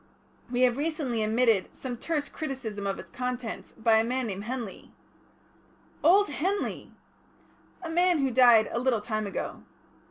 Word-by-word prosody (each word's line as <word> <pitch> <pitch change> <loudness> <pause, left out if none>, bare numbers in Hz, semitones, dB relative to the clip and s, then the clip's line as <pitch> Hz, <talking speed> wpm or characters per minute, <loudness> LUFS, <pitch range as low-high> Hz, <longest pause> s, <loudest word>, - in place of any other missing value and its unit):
We 245 0 -1
have 250 -1 +4
recently 290 -6 -1
admitted 220 -2 +2
some 255 -2 -5
terse 290 +4 -2
criticism 240 -11 -5
of 195 - -2
its - - -11
contents 250 -2 -4
by 225 -1 +3
a - - +2
man 250 +2 -1
named 200 -1 -5
Henley." 235 -4 -6 1.1
"Old 390 +6 +6
Henley!" 370 +8 -2 0.9
"A 335 - -4
man 355 +1 +3
who 270 -3 +1
died 240 -3 +6
a 235 - -1
little 245 -3 +1
time 215 -1 -2
ago." 195 - -5
250 Hz, 150 wpm, -28 LUFS, 220-285 Hz, 1.1 s, Old